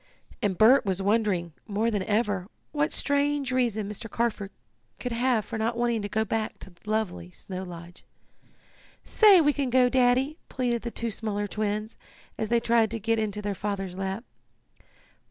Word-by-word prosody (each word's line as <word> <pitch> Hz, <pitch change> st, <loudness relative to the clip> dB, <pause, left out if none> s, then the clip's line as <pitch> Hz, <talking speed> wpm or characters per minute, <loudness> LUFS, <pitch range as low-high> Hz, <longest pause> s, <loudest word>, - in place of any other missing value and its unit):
And 195 Hz, -3 st, 0 dB
Bert 240 Hz, +6 st, +6 dB
was 190 Hz, -2 st, -1 dB
wondering, 195 Hz, -5 st, +1 dB
more 220 Hz, +2 st, 0 dB
than 205 Hz, -3 st, 0 dB
ever, 205 Hz, -2 st, 0 dB, 0.2 s
what 295 Hz, 0 st, 0 dB
strange 285 Hz, -1 st, +1 dB
reason 235 Hz, -5 st, 0 dB
Mr. 210 Hz, +2 st, -7 dB
Carford 220 Hz, -3 st, -1 dB, 0.5 s
could 250 Hz, -, -4 dB
have 235 Hz, -2 st, +1 dB
for 225 Hz, -, -5 dB
not 230 Hz, +2 st, -1 dB
wanting 235 Hz, -2 st, +1 dB
to 205 Hz, -, -4 dB
go 220 Hz, +2 st, 0 dB
back 220 Hz, -1 st, -2 dB
to 190 Hz, -, -11 dB
lovely 210 Hz, -, -2 dB
Snow 185 Hz, -, -7 dB
Lodge. 175 Hz, -1 st, -10 dB, 1.0 s
"Say 415 Hz, -4 st, +6 dB
we 295 Hz, -1 st, +3 dB
can 275 Hz, -3 st, -1 dB
go, 250 Hz, 0 st, +4 dB
Daddy!" 260 Hz, +4 st, +2 dB
pleaded 240 Hz, -3 st, -1 dB
the 235 Hz, -, -4 dB
two 230 Hz, 0 st, -3 dB
smaller 205 Hz, -1 st, -2 dB
twins, 215 Hz, +1 st, -3 dB, 0.4 s
as 220 Hz, -, -3 dB
they 235 Hz, -, +3 dB
tried 230 Hz, -1 st, +3 dB
to 225 Hz, +1 st, -4 dB
get 225 Hz, +2 st, 0 dB
into 210 Hz, -1 st, -2 dB
their 205 Hz, 0 st, -1 dB
father's 195 Hz, -2 st, -4 dB
lap. 195 Hz, +3 st, -3 dB
220 Hz, 170 wpm, -27 LUFS, 200-240 Hz, 1.0 s, Bert